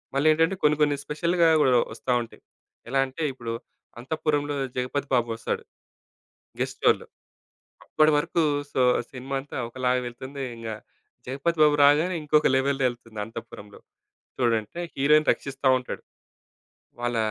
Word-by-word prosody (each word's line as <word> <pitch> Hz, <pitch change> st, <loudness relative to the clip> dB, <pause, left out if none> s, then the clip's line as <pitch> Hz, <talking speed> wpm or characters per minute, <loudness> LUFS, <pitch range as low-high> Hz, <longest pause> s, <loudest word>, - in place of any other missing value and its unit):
మళ్ళీ 140 Hz, +3 st, +2 dB
ఏంటంటే 165 Hz, +4 st, +2 dB
కొన్ని 150 Hz, 0 st, +5 dB
కొన్ని 145 Hz, -1 st, +2 dB
స్పెషల్‌గా 170 Hz, +3 st, +2 dB
గూడా 130 Hz, -3 st, +4 dB, 0.2 s
ఒస్తా 125 Hz, +2 st, -4 dB
ఉంటాయి. 115 Hz, -, -15 dB, 0.5 s
ఎలా 135 Hz, +2 st, +1 dB
అంటే 145 Hz, +5 st, -6 dB
ఇప్పుడు 120 Hz, -3 st, -5 dB, 0.5 s
అంతఃపురంలో 145 Hz, +1 st, -1 dB, 0.2 s
'జగపతి 130 Hz, +3 st, -2 dB
బాబు' 120 Hz, -2 st, +1 dB
వస్తాడు 115 Hz, -, -3 dB, 1.0 s
గెస్ట్ -, -, -3 dB
రోలో -, -, +4 dB, 0.8 s
అప్పడి 155 Hz, 0 st, +3 dB
వరకు 165 Hz, +2 st, +1 dB, 0.3 s
సో 130 Hz, -, +2 dB, 0.3 s
సినిమాంతా 135 Hz, +2 st, -5 dB
ఒకలాగా 125 Hz, +1 st, 0 dB
వెళ్తుంది. 130 Hz, +3 st, -7 dB
ఇంగ 115 Hz, -1 st, -7 dB, 0.6 s
'జగపతి 140 Hz, +6 st, -2 dB
బాబు' 150 Hz, -1 st, +5 dB
రాగానే 155 Hz, +6 st, +4 dB
ఇంకొక 150 Hz, 0 st, +3 dB
లెవెల్ 135 Hz, +1 st, +1 dB
ఎళ్తుంది 115 Hz, -3 st, -9 dB
అంతపురంలో. 105 Hz, -2 st, -10 dB, 0.6 s
చూడంటే 120 Hz, +5 st, 0 dB, 0.2 s
హీరోయిను 150 Hz, +2 st, +4 dB
రక్షిస్తా 135 Hz, -1 st, -2 dB
ఉంటాడు. 125 Hz, -, -7 dB, 1.0 s
వాళ్ళ 120 Hz, -1 st, -1 dB
135 Hz, 125 wpm, -25 LUFS, 125-150 Hz, 1.0 s, కొన్ని